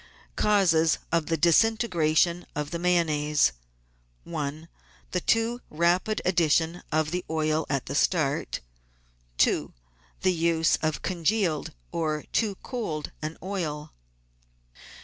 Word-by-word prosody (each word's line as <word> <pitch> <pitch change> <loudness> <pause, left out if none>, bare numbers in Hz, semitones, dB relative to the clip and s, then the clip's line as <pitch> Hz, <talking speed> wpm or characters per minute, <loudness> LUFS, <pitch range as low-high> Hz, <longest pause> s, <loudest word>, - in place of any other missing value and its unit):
Causes 170 -6 +3
of 165 -2 +1
the 165 - 0
Disintegration 170 -2 +3
of 150 -1 -3
the 170 - -3
Mayonnaise: 155 - +2 0.4
— - - -39
1. 155 -1 -5 0.4
The 180 - -1
too 230 +4 +1
rapid 175 +6 +1
addition 165 -1 +2
of 155 0 +1
the 180 0 -2
oil 155 0 0
at 140 -3 -1
the 140 - -5
start. 150 -1 0 0.8
2. - - +2 0.5
The 185 - +3
use 165 -1 +2
of 155 -1 -2
congealed, 180 -2 0 0.2
or 155 -2 -1
too 210 -3 +1
cold, 190 - -4
an 155 +1 -4
oil. 160 -6 -4
165 Hz, 115 wpm, -27 LUFS, 155-180 Hz, 0.8 s, Causes